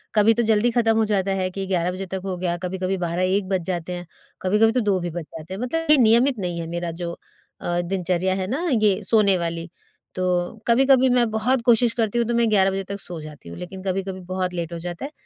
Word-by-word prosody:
कभी 215 +2 +5
तो 235 - +1
जल्दी 225 +2 +3
खत्म 225 -2 +2
हो 220 - +3
जाता 200 -2 0
है 185 - 0
कि 195 +1 -4
11 180 -1 0
बजे 190 +1 -5
तक 190 0 -5
हो 185 -1 -2
गया, 175 -1 -1
कभी-कभी 185 +1 -2
12-1 185 +3 0
बज 190 -2 +1
जाते 180 -1 -3
हैं, 175 0 -6 0.4
कभी-कभी 210 +4 +3
तो 255 - +1
2 200 -4 +1
भी 175 0 -3
बज 170 0 -5
जाते 160 +4 -10
हैं। 195 - -5
मतलब 325 +5 0
ये 300 - +7
नियमित 240 +1 +4
नहीं 175 -2 -3
है 165 - -4
मेरा 170 0 -3
जो 170 - -3 0.5
अ, 175 0 0
दिनचर्या 185 0 -1
है 185 -1 -2
ना, 275 - -2
ये 215 -4 +2
सोने 200 -3 +4
वाली, 170 0 -3 0.5
तो 185 - -2 0.4
कभी-कभी 260 +2 +5
मैं 240 -2 +3
बहुत 235 +3 +1
कोशिश 235 -1 +4
करती 225 0 -1
हूँ 235 - +1
तो 235 - 0
मैं 235 -1 +3
11 195 -2 +4
बजे 195 0 -2
तक 200 +1 -6
सो 175 -3 -7
जाती 150 - -11
हूँ, 85 - -9
लेकिन 185 +1 -8
कभी-कभी 190 0 -3
बहुत 185 -1 -1
लेट 170 -1 -4
हो 170 - -5
जाता 175 +8 -5
है, 295 - -7
190 Hz, 240 wpm, -23 LUFS, 175-225 Hz, 0.5 s, ये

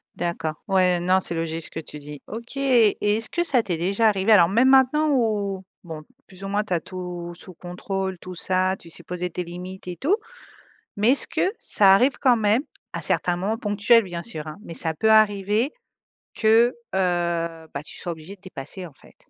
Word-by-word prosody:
D'accord. 170 -2 -3
Ouais, 185 -2 +3
non, 185 +2 +3
c'est 175 - -4
logique 165 0 -3
ce - - -10
que - - -5
tu 150 -1 -9
dis. 145 0 -10
OK, 235 +5 -7
et 245 -6 +3 0.2
est-ce 225 - -4
que 345 - 0
ça 265 -9 +2
t'est 175 -5 -2
déjà 195 +7 +2
arrivé, 200 0 +2
alors 175 -6 +7
même 235 +7 +4
maintenant 270 +4 +4
ou, 205 -7 0 0.2
bon, 160 -3 -8 0.2
plus 190 0 -12
ou - - -4
moins 205 +1 0
tu 210 - -3
as 170 - +2
tout 180 -2 -7
sous-contrôle, 185 +2 -5
tout 185 +1 -9
ça, 185 +2 +1
tu 170 - -13
sais, 170 - -6
poser 180 +1 -4
tes 180 +1 -4
limites 180 +2 -9
et 180 - -4
tout, 310 - +1 0.8
mais 215 +4 +4
est-ce 275 - +3
que 335 +3 0
ça 195 -2 +5
arrive 250 +8 +3
quand 250 -3 +4
même, 215 +3 +2 0.3
à - - -4
certains 175 - +1
moments 200 +5 -2
ponctuels 215 +1 +3
bien 175 -3 -6
sûr, 155 -10 -7
hein, 155 - -7
mais 170 - -8
ça 160 0 0
peut 220 +7 +2
arriver 215 +3 +3 0.6
que, 230 +3 +4 0.2
heu, 170 -3 -1
ben, - - -4
tu - - -8
sois 175 - -4
obligé 165 +4 -9
dépasser 185 -2 -8
en 160 - -12
fait? - - -20
190 Hz, 200 wpm, -23 LUFS, 175-220 Hz, 0.8 s, alors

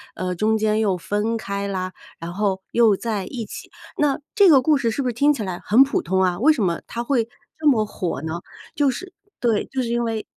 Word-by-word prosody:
呃， 185 0 -2
中 215 +5 +1
间 215 0 +1
又 200 -4 +1
分 210 +5 -1
开 200 -2 -4
啦， 185 -1 -3 0.3
然 170 +1 -6
后 195 -1 -1
又 230 -3 +4
在 210 -4 -3
一 240 -4 -5
起。 - - -9 0.3
那 290 -1 +2
这 405 -3 +6
个 285 -5 +7
故 300 +4 +3
事 245 -5 0
是 250 +5 -2
不 - - -1
是 245 - -1
听 285 +6 +3
起 265 -7 -2
来 185 -3 -5
很 240 +6 +6
普 275 - -1
通 190 +2 0
啊， 180 -1 0
为 295 +8 +5
什 290 -9 0
么 170 -3 0
它 235 - -4
会 240 -2 +1 0.3
这 310 -1 -1
么 220 -6 +3
火 180 -8 -4
呢？ 160 +2 -4 0.3
就 285 -2 +3
是 370 +8 -8 0.3
对， 230 -4 +1
就 265 - -1
是 245 - -2
因 240 0 0
为 225 -2 -2
220 Hz, 255 characters per minute, -22 LUFS, 195-255 Hz, 0.3 s, 个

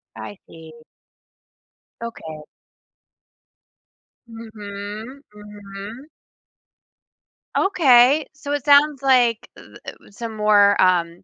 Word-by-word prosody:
I 205 - -10
see. 160 -1 -14 1.3
Okay. 160 -10 -9 1.8
Mhm. 220 +2 -10
Mhm. 210 +4 -11 1.5
Okay, 285 -6 +3
so 295 -1 -8
it 290 -3 -4
sounds 285 -1 +3
like 245 -4 +2
the, - - -15
uh - - -18 0.2
that - - -9
was 200 - -21
some 225 -2 -7
more, 205 -1 +3
um 175 -2 0
220 Hz, 90 wpm, -20 LUFS, 200-265 Hz, 1.8 s, Okay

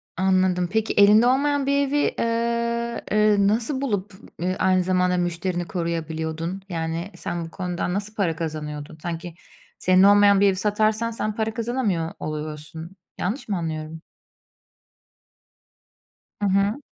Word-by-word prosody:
Anladım. 185 -1 +2
Peki 220 +1 0
elinde 210 +3 +6
olmayan 280 +2 +2
bir 280 +1 +2
evi, 285 +2 0 0.2
eee, 235 0 -1
eee, 215 0 +4
nasıl 230 +6 0
bulup, 205 -7 -2 0.3
eee, 180 +2 -1
aynı 185 -1 +3
zamanda 180 0 +1
müşterini 175 0 -2
koruyabiliyordun? 165 +1 -3
Yani 165 +2 -3
sen 170 -1 -4
bu 165 - -11
konudan 180 -1 -3
nasıl 205 +2 -2
para 175 -7 0
kazanıyordun? 150 -2 -5
Sanki 170 0 -5 0.4
senin 185 +1 +4
olmayan 205 0 +6
bir 200 - +6
evi 195 - +2
satarsan 215 +3 +1
sen 215 -1 -2
para 220 0 -1
kazanamıyor 225 -9 -1
oluyorsun. 155 +3 -6 0.2
Yanlış 205 +10 -3
mı 200 - 0
anlıyorum? 160 -1 -5 2.4
Hı - - +1
hı. 200 +8 +1
190 Hz, 130 wpm, -23 LUFS, 170-220 Hz, 2.4 s, elinde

